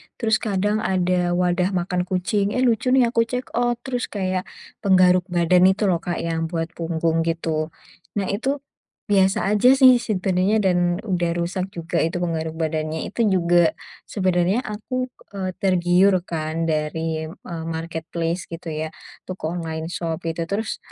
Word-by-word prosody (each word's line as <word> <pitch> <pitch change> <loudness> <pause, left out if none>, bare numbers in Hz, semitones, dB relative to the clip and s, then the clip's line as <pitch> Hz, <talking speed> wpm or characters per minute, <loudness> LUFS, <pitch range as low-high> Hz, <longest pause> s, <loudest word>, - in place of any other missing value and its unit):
terus 220 -2 +1
kadang 210 0 0
ada 180 -3 +1
wadah 180 +1 +1
makan 180 0 -1
kucing, 200 +2 0
"eh 255 - +2
lucu 240 0 +2
nih." 245 -3 +4
Aku 230 -1 +2
check 250 +2 -4
out, 240 +1 +1
terus 250 -2 -2
kayak 185 -2 -2 0.3
penggaruk 185 -1 +4
badan 180 +1 +4
itu 190 +3 +2
loh 170 - +1
Kak, 175 +1 -3
yang 165 -1 -1
buat 165 0 -3
punggung 165 -1 -1
gitu. 160 -2 -1 0.5
Nah 195 -2 -1
itu, 270 +7 -2 0.5
biasa 195 0 +3
aja 210 +4 +4
sih 260 -2 +7
sebenarnya, 190 -2 +1
dan 185 -2 +3 0.3
udah 175 -5 0
rusak 180 +2 -2
juga 170 0 -2
itu 165 +2 0
penggaruk 160 -1 -2
badannya, 160 -1 -2
itu 230 +1 +1
juga 175 -3 +3 0.3
sebenarnya 185 +3 +1
aku, 225 +4 -3 0.3
eee, 185 -1 -2
tergiur 185 +1 +3
kan 160 -1 -3
dari, 160 +1 -2
eee, 165 0 -8
marketplace 165 +1 -3
gitu 165 0 -7
ya, 155 +1 -3 0.4
toko 175 -4 -4
online 160 0 -4
shop 165 -1 -3
gitu, 165 0 -3
terus 210 +4 -2
180 Hz, 150 wpm, -22 LUFS, 165-200 Hz, 0.5 s, sih